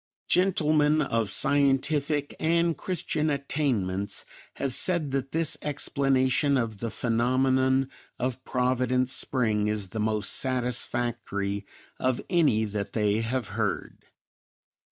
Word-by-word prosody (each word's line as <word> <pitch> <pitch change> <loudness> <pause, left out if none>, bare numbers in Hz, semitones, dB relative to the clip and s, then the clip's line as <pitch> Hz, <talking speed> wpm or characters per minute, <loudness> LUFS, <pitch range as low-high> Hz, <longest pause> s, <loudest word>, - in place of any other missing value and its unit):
Gentlemen 155 -4 +3
of 115 -6 0
scientific 145 +1 +1
and 170 +1 +2
Christian 160 -4 -2
attainments 120 -9 -1 0.3
have 135 -2 -2
said 165 -2 +2
that 135 0 -2
this 165 -1 +2
explanation 135 -1 +1
of 115 -4 -2
the 115 - -3
phenomenon 130 +3 +1 0.3
of 130 0 -3
Providence 125 0 0
Spring 110 -5 0
is 105 -3 -1
the 110 - -5
most 110 -1 0
satisfactory 120 -5 -2 0.3
of 130 -1 +1
any 145 - +3
that 100 -1 -4
they 105 -1 +1
have 125 +2 -2
heard. - - -3
130 Hz, 110 wpm, -27 LUFS, 115-145 Hz, 0.3 s, Gentlemen